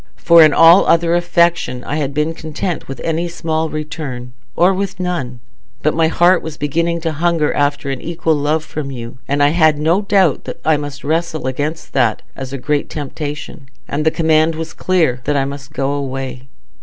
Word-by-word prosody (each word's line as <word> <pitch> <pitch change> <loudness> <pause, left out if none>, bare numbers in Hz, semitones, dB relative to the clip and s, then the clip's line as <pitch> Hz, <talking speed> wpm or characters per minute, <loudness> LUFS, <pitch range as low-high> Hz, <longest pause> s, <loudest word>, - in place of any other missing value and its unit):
For 170 0 +6
in 155 -1 +7
all 165 +4 +6
other 170 0 +3
affection 170 -7 +1
I 145 - -3
had 145 -3 -1
been 150 +3 -1
content 160 +2 -4
with 135 - -7
any 165 +1 -1
small 160 -1 -2
return, 150 -5 -6 0.2
or 180 +3 +4
with 195 0 -3
none; 135 -10 -3 0.4
but 155 - +2
my 165 0 +2
heart 175 +3 +3
was 160 -2 -7
beginning 170 +3 -1
to 165 0 -1
hunger 160 0 +1
after 145 -1 0
an 135 - -5
equal 165 -1 -1
love 150 +1 0
from 150 -3 -5
you. 120 -2 -8
And 145 +1 +1
I 145 - +5
had 155 -1 +3
no 165 +6 +2
doubt 195 -6 +2
that - - -7
I 160 - +4
must 145 -1 -6
wrestle 160 0 -1
against 145 +5 -3
that 120 -5 +1
as 135 -1 -7
a 140 - -4
great 145 +2 -1
temptation, 150 -1 -6 0.2
and 150 +2 -2
the 160 - +4
command 160 0 +2
was 160 0 -6
clear 165 -9 +1
that 145 - +1
I 135 - +1
must 140 +1 -7
go 140 -3 -1
away." 135 -2 -4
155 Hz, 195 wpm, -17 LUFS, 140-165 Hz, 0.4 s, in